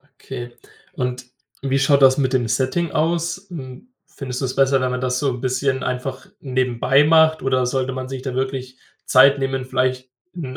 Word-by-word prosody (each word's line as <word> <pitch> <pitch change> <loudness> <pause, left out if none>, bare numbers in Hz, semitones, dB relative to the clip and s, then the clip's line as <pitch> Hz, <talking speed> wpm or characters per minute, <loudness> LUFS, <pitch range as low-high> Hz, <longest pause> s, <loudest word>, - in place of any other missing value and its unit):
Okay, 120 -2 -8 0.4
und 125 -1 -3 0.4
wie 135 0 0
schaut 140 +1 +3
das 130 -1 +6
mit 135 -2 0
dem 125 -3 +1
Setting 130 +9 0
aus? 170 +3 -1
Hm, 140 - -9 0.2
findest 130 -2 -7
du - - 0
es 130 - -4
besser, 135 0 +3
wenn 130 0 0
man 125 0 -3
das 125 0 -1
so 145 - +1
'n 125 -1 -6
bisschen 130 +1 -1
einfach 130 +1 -4
nebenbei 130 +1 +2
macht 160 0 +4
oder 130 -1 +1
sollte 130 +1 -1
man 130 0 -5
sich 135 -1 -5
da 130 - -4
wirklich 130 -1 -3 0.3
Zeit 140 +1 +5
nehmen, 135 -1 -2
vielleicht 130 0 -1 0.2
in 175 -2 -6
130 Hz, 185 wpm, -21 LUFS, 130-140 Hz, 0.4 s, das